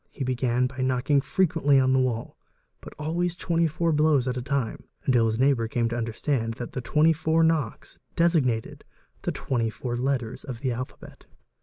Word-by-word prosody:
He 140 - -5
began 125 -1 +1
by 130 +1 -5
knocking 130 +2 +2
frequently 160 -5 +2
on 130 0 +3
the 130 - +4
wall, 120 -3 -1 0.5
but - - -11
always 170 +3 -1
24 170 -1 0
blows 150 -4 +3
at 125 - -1
a 125 - -3
time, 135 -2 -2 0.2
until 120 -6 +3
his 110 0 -1
neighbour 130 -3 +2
came 115 +1 0
to 120 - -3
understand 115 0 -2
that 120 - -6
the 130 - -4
24 160 +4 +2
knocks 160 -8 -1 0.2
designated 150 -10 +1 0.4
the - - -1
24 120 0 -2
letters 125 -3 -2
of 125 -3 -7
the 130 -2 0
alphabet. 125 +2 -8
130 Hz, 165 wpm, -26 LUFS, 120-155 Hz, 0.5 s, the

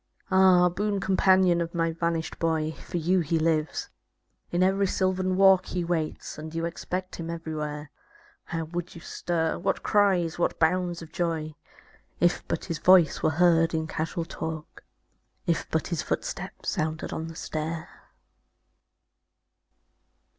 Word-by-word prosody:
Ah, 185 -1 +6
boon 200 +3 -1
companion 185 -2 +4
of 170 +1 -4
my 165 -1 +1
vanished 165 0 -2
boy. 160 -1 0
For 165 - -6
you 180 +3 +2
he 165 0 0
lives; 160 -1 0 0.6
in 175 +1 +2
every 195 +1 +2
sylvan 185 0 0
walk 190 -1 +6
He 180 -1 -2
waits; 165 -3 -3
and 155 +1 -8
you 165 0 -1
expect 180 +2 -4
him 165 -1 -5
everywhere. 150 -3 -5 0.5
How 165 -1 -3
would 175 +3 -5
you 170 - -9
stir, 165 -1 -2
what - - -1
cries, 185 -6 +2
what - - +1
bounds 175 +1 +1
of 160 - -12
joy. 165 -4 -2 0.7
If 175 0 +3
but - - -2
his 165 -3 -4
voice 180 -4 +5
were - - +3
heard 165 0 +3
in 160 0 0
casual 165 +2 -3
talk. 160 -1 -6 0.6
If - - 0
but - - -1
his - - -1
footstep - - -4
sounded 155 0 -2
on 160 - -4
the 165 - -9
stair! 160 +1 -4
170 Hz, 145 wpm, -27 LUFS, 160-180 Hz, 0.7 s, Ah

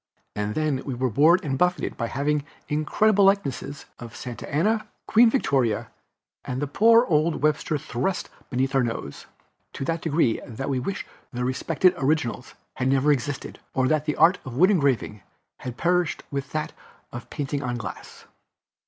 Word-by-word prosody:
And 105 0 -2
then 150 -4 0
we 135 - -4
were 130 0 -1
bored 160 - +4
and 135 -2 -2
buffeted 180 0 +1
by 115 - -2
having 145 +3 0 0.2
incredible 195 +7 +3
likenesses 145 -7 0
of 120 0 -9
Santa 120 -2 -7
Anna, 215 +9 +1 0.2
Queen 230 +1 +6
Victoria 135 - 0 0.5
and 135 +3 -4
poor 230 +2 +6
old 155 -3 +1
Webster 155 0 +1
thrust 140 +7 -2 0.2
beneath 130 +1 0
our 135 - +4
nose, 115 - -4 0.5
to 135 - -4
that 165 +1 -1
degree 155 -8 +1
that 130 +4 -5
we 135 -2 0
wished 190 +10 -4 0.3
the 125 0 -2
respected 160 +8 +2
originals 135 -4 -1 0.2
had 130 - 0
never 135 +2 +3
existed, 145 0 -3 0.2
or 130 -1 +2
that 155 -1 +1
the 150 - -1
art 170 +5 +5
of 130 -2 -8
wood 185 +6 +6
engraving 135 - +1 0.4
had 125 -2 -7
perished 175 +1 +1
with 140 -1 -4
that 155 0 -3 0.4
of 120 - -8
painting 145 -1 -3
on 120 -2 -2
glass. 95 -7 -8
140 Hz, 160 wpm, -25 LUFS, 125-165 Hz, 0.5 s, Queen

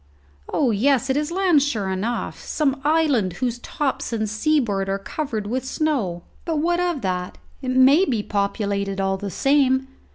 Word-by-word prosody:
Oh 265 -5 +2
yes, 265 +4 +2
it - - 0
is 300 +2 -1
land, 360 -5 +3
sure 220 -9 -1
enough! 215 +6 -3
some 280 -3 0
island 290 - +2
whose 240 +5 -2
tops 270 +1 -3
and 220 -2 -1
seaboard 220 -4 0
are 195 - 0
covered 220 +1 -4
with 250 +4 -2
snow. 260 - -1 0.2
But 325 -2 -1
what 345 +3 +1
of 350 -5 0
that? 180 -2 -3 0.2
It 260 - -4
may 265 +7 +5
be 230 - -1
populated 200 -1 -1
all 195 0 0
the 200 +1 -5
same. 265 +2 +2
255 Hz, 165 wpm, -22 LUFS, 200-295 Hz, 0.2 s, may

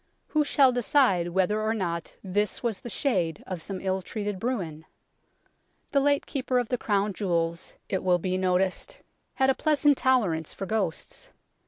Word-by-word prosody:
Who 305 -1 +2
shall 275 -2 +4
decide 245 -7 +3
whether 190 +4 +1
or 220 +1 0
not 170 -5 -3
this 205 +1 -1
was 225 -5 -1
the 240 - -7
shade 180 - -1
of 180 -3 -5
some 190 +3 -5
ill 190 0 -1
treated 205 0 -4
Bruin? 180 -10 -3 1.0
The 280 - +4
late 285 0 +2
Keeper 260 -2 -1
of 245 -2 0
the 250 - 0
Crown 205 -1 0
Jewels, 170 -3 -2
it 190 - -1
will 180 -1 +4
be 185 +1 -2
noticed, 185 - 0 0.3
had 265 -1 +4
a - - +2
pleasant 295 -1 +3
tolerance 195 -12 +1
for 195 - -4
ghosts. 200 -5 -3
200 Hz, 165 wpm, -27 LUFS, 180-250 Hz, 1.0 s, shall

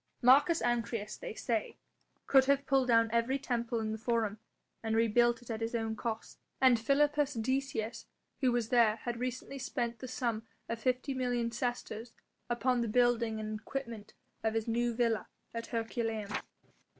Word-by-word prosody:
Marcus 290 +7 +6
Ancyrus, 230 -3 -1
they - - -7
say, 225 -2 -2 0.5
could 270 -1 +6
have 280 +1 +2
pulled 270 -1 +3
down 230 -2 +4
every 235 +4 +2
temple 235 -3 -1
in 215 -1 -2
the 220 - -4
Forum 220 -2 0 0.4
and 225 -1 -1
rebuilt 235 +1 +3
it 240 - -7
at 225 0 -4
his 225 +1 -2
own 225 -1 -1
cost, 225 +1 -5 0.2
and 255 -3 +6
Philippus 290 +3 +2
Decius 240 -1 -2 0.3
who 255 -3 +3
was 240 -2 0
there 230 -3 +5
had 235 +1 -5
recently 255 +2 -4
spent 235 -2 -2
the 255 - -6
sum 235 -3 -1 0.3
of 230 0 -3
fifty 255 +3 0
million 245 -2 0
sesterces 235 -1 -3 0.4
upon 240 +1 +1
the 235 - 0
building 235 -1 +2
and 215 0 -4
equipment 235 -3 -6 0.3
of 220 0 0
his 225 0 -1
new 240 +1 +1
villa 230 -2 +1 0.3
at 230 0 -4
Herculaneum. 225 -2 -2
235 Hz, 160 wpm, -32 LUFS, 225-255 Hz, 0.5 s, Marcus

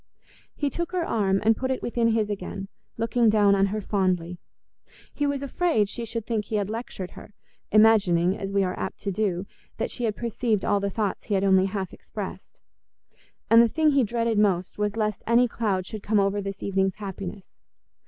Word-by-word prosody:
He 285 -2 -1
took 345 +4 -4
her 355 -2 0
arm 195 -6 +1
and 225 0 +5
put 260 +3 -3
it 260 - -2
within 235 -1 +1
his 220 -2 +1
again, 195 0 -5 0.3
looking 230 0 +2
down 205 -2 +4
on 195 0 +3
her 210 +2 -3
fondly. 180 -4 -1 0.7
He 290 - 0
was 280 -1 -2
afraid 280 - +1
she 230 +3 -5
should 230 -1 -4
think 220 -3 -1
he 220 - -4
had 205 0 -1
lectured 220 -5 -5
her, 210 - -13 0.4
imagining, 195 -5 +4
as 195 -1 -5
we 200 0 +2
are 180 -1 -1
apt - - -4
to 200 - -2
do, 190 -2 -1 0.3
that - - -2
she 245 - -2
had 215 -2 -1
perceived 230 -2 -1
all 205 - +2
the 200 0 -1
thoughts 205 -1 -3
he 205 - +1
had 195 - +1
only 190 -1 +4
half 190 -1 -4
expressed. - - -8 0.8
And 230 +1 +7
the 235 - +5
thing 310 +5 +2
he 275 -2 +3
dreaded 230 -1 0
most 190 -2 +1
was 210 +1 -1
lest 215 -2 -1
any 235 +2 +5
cloud 205 -5 -1
should 215 +1 -7
come 210 +1 +1
over 200 +1 +1
this 195 0 -6
evening's 190 -1 0
happiness. 195 -1 -7
210 Hz, 200 wpm, -25 LUFS, 195-230 Hz, 0.8 s, And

